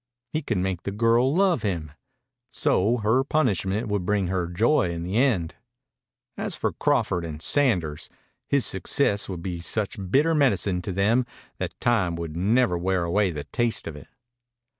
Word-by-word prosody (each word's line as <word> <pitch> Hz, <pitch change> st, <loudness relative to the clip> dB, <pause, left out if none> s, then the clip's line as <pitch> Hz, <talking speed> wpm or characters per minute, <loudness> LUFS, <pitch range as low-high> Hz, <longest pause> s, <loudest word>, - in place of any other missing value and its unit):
He 155 Hz, -, 0 dB
could 110 Hz, -, -2 dB
make 90 Hz, -1 st, -1 dB
the 100 Hz, -, -4 dB
girl 115 Hz, +5 st, +3 dB
love 185 Hz, +1 st, +2 dB
him. 85 Hz, -7 st, -3 dB, 0.6 s
So 115 Hz, -1 st, +1 dB
her 120 Hz, +5 st, +3 dB
punishment 110 Hz, -, 0 dB
would 105 Hz, -3 st, -1 dB
bring 100 Hz, -1 st, 0 dB
her 90 Hz, -2 st, -1 dB
joy 115 Hz, -, +2 dB
in 85 Hz, -1 st, -4 dB
the 95 Hz, +5 st, -2 dB
end. 110 Hz, -11 st, +1 dB, 0.8 s
As -, -, -3 dB
for -, -, -2 dB
Crawford 90 Hz, -2 st, 0 dB
and 80 Hz, -2 st, -6 dB
Sanders, 90 Hz, -, +1 dB, 0.4 s
his 140 Hz, -3 st, +2 dB
success 100 Hz, +3 st, 0 dB
would 90 Hz, -3 st, -6 dB
be 90 Hz, -3 st, -4 dB
such 105 Hz, +3 st, -2 dB
bitter 150 Hz, -, +3 dB
medicine 100 Hz, -, +1 dB
to 90 Hz, -, -4 dB
them 110 Hz, +7 st, +2 dB, 0.3 s
that -, -, -5 dB
time 100 Hz, -8 st, +1 dB
would 85 Hz, -2 st, -6 dB
never 95 Hz, 0 st, +2 dB
wear 95 Hz, 0 st, 0 dB
away 95 Hz, +4 st, +1 dB
the 75 Hz, -4 st, -5 dB
taste 115 Hz, -, -1 dB
of 80 Hz, -, -6 dB
it. 75 Hz, -, -12 dB
100 Hz, 165 wpm, -25 LUFS, 85-120 Hz, 0.8 s, girl